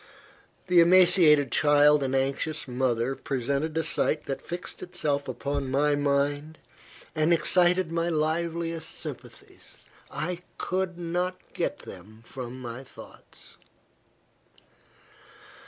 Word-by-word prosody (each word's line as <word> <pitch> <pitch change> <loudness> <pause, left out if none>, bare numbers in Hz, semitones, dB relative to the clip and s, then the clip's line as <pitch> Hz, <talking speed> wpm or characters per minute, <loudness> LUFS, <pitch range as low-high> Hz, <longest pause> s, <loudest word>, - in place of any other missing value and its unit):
The 180 -1 +4
emaciated 170 -6 +5
child 145 0 +4
and 135 -1 -1
anxious 140 +3 -1
mother 125 0 0
presented 140 +5 -2
a 160 - +1
sight 155 0 0
that 135 - -4
fixed 175 +1 -7
itself 150 -6 -2
upon 140 +2 -3
my 145 +2 +2
mind, 145 +2 -1 0.6
and 155 +1 +1
excited 175 +1 +3
my 165 0 0
liveliest 165 +1 -2
sympathies. - - -9 0.3
I 175 +2 -4 0.2
could 185 -1 -2
not 175 +2 -2 0.2
get - - -2
them 110 +5 -13
from 130 0 -8
my 120 +1 -7
thoughts. - - -14
150 Hz, 105 wpm, -27 LUFS, 135-170 Hz, 0.6 s, emaciated